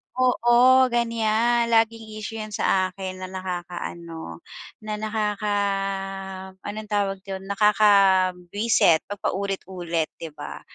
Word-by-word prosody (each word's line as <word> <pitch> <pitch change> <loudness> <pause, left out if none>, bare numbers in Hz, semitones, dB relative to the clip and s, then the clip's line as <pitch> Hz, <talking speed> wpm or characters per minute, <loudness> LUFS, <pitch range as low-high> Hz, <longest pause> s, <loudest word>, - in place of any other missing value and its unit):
oo, 255 +1 +5
ganyan. 230 0 +2
Laging 225 0 +2 0.2
issue 225 +1 -5
yan 215 -1 -6
sa 185 -1 +1
akin 185 -1 -6
na - - -4
nakakaano, 175 - -6 0.4
na 215 - -3
nakaka 210 -1 -1 1.1
anong 215 +1 -6
tawag 200 -1 0
do'n? 190 -1 -5
Nakakabwisit 195 -3 +3
'pag 205 - -5
paulit-ulit 185 -4 -2
'di 165 - -5
ba? - - -7
205 Hz, 105 wpm, -24 LUFS, 185-220 Hz, 1.1 s, oo